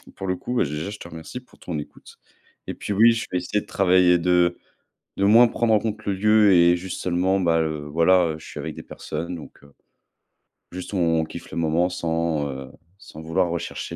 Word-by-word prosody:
pour 95 - -6
le 90 - 0
coup, 125 - -6
bah, - - +3
déjà, 75 +5 -4
je 105 - -8
te - - -9
remercie 80 +8 -8
pour 125 -1 -23
ton 80 -4 -5
écoute. 75 - -12 0.5
Et - - -3
puis 105 - -4
oui, 115 +3 +6
je 115 - -3
vais 90 - 0
essayer 100 +4 -2
de - - -15
travailler 90 -2 +3
de 90 0 +2 0.6
de 100 - 0
moins 115 +4 +7
prendre 115 -1 0
en 105 - +5
compte 110 0 -4
le 100 - 0
lieu 105 +1 +4
et 85 0 +5
juste 90 +1 -6
seulement, 90 +2 +1
bah, 85 -3 +2
heu, 75 -2 -3
voilà, 85 +2 +3
heu, - - -7
je - - -14
suis 75 - -9
avec 80 +1 -6
des - - -9
personnes, 85 +3 -6
donc, 75 -3 -12
heu, 70 -1 -19 1.0
juste 90 +2 -7
on 85 -3 +2
on - - +1
kiffe - - -10
le - - -6
moment. 85 +2 +1
Sans, 80 -4 -1
heu, 65 -1 -8 0.3
sans 80 -5 -12
vouloir 80 +2 0
rechercher 85 -2 -5
90 Hz, 225 wpm, -23 LUFS, 80-95 Hz, 1.0 s, moins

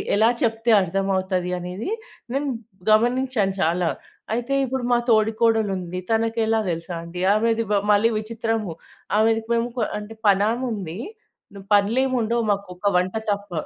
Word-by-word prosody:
ఎలా 220 +3 +5
చెప్తే 225 0 +2
అర్థం 195 +2 -1
అవుతది? 185 -1 -1
అనేది 180 - -5 0.4
నేను 280 +2 -1 0.4
గమనించాను 235 -3 +2
చాలా. 175 0 +1 0.5
అయితే 240 +3 -2
ఇప్పుడు 260 0 -3
మా - - +5
తోడికోడలుంది, 215 -5 +1
తనకెలా 225 0 +1
తెలుసా 165 +1 -5
అండి? 170 +1 -7
ఆమెది 230 +1 +1
బ - - +3 0.2
మళ్ళీ 220 +3 +3
విచిత్రము. 225 -3 -3 0.5
ఆమెది 225 0 +3
పేముప 235 +1 0 0.2
అంటే 210 +1 -9
పనామె 210 +6 +3
ఉంది. 185 -3 -6 0.8
పనులేముండవు 235 +2 +1
మాకు 200 0 -2
ఒక 200 - -2
వంట 180 +3 0 0.2
తప్ప. 205 -1 -4
220 Hz, 125 wpm, -23 LUFS, 195-230 Hz, 0.8 s, ఎలా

